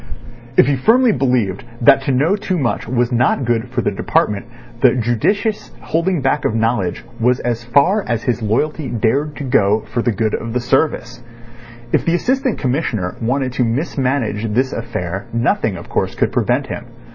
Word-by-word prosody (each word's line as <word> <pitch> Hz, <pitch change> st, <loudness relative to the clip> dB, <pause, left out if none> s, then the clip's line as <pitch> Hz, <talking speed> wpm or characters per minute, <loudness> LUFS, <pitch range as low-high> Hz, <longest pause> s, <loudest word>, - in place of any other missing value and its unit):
If -, -, +7 dB
he 140 Hz, -, +2 dB
believed 130 Hz, -, -3 dB
firmly 130 Hz, -, +3 dB, 0.3 s
that 135 Hz, +3 st, +6 dB
to -, -, +1 dB
know 145 Hz, +9 st, +2 dB
too 205 Hz, -3 st, -2 dB
much 130 Hz, -7 st, -1 dB
was 120 Hz, 0 st, 0 dB
not 125 Hz, +2 st, +2 dB
good 120 Hz, +1 st, 0 dB
for 120 Hz, -1 st, -2 dB
the -, -, +1 dB
department, 100 Hz, +2 st, 0 dB, 0.3 s
the -, -, +5 dB
judicious 125 Hz, -, 0 dB
holding 170 Hz, 0 st, -1 dB
back 135 Hz, +2 st, +1 dB
of 110 Hz, -, 0 dB
knowledge 110 Hz, -5 st, -1 dB
was 125 Hz, +2 st, +2 dB
as 120 Hz, -1 st, -2 dB
far 155 Hz, -, +3 dB
as 115 Hz, -1 st, -1 dB
his 120 Hz, -1 st, -1 dB
loyalty 135 Hz, +7 st, -1 dB
dared 135 Hz, +7 st, 0 dB
to 145 Hz, -, -6 dB
go 105 Hz, -4 st, +2 dB
for 115 Hz, +3 st, -3 dB
the 120 Hz, -, +1 dB
good 110 Hz, +1 st, -1 dB
of 115 Hz, 0 st, -3 dB
the 125 Hz, -, +1 dB
service. 120 Hz, -1 st, 0 dB, 0.7 s
If -, -, +2 dB
the 170 Hz, -, +1 dB
Assistant 260 Hz, +5 st, 0 dB
Commissioner 125 Hz, -, -1 dB
wanted 130 Hz, +2 st, -1 dB
to 125 Hz, -, +1 dB
mismanage 125 Hz, -4 st, -1 dB
this 130 Hz, +4 st, +1 dB
affair 100 Hz, -5 st, -4 dB
nothing, 115 Hz, -, 0 dB
of 85 Hz, -, -10 dB
course, -, -, -2 dB
could -, -, 0 dB
prevent -, -, +1 dB
him. -, -, -7 dB
125 Hz, 180 wpm, -18 LUFS, 115-145 Hz, 0.7 s, If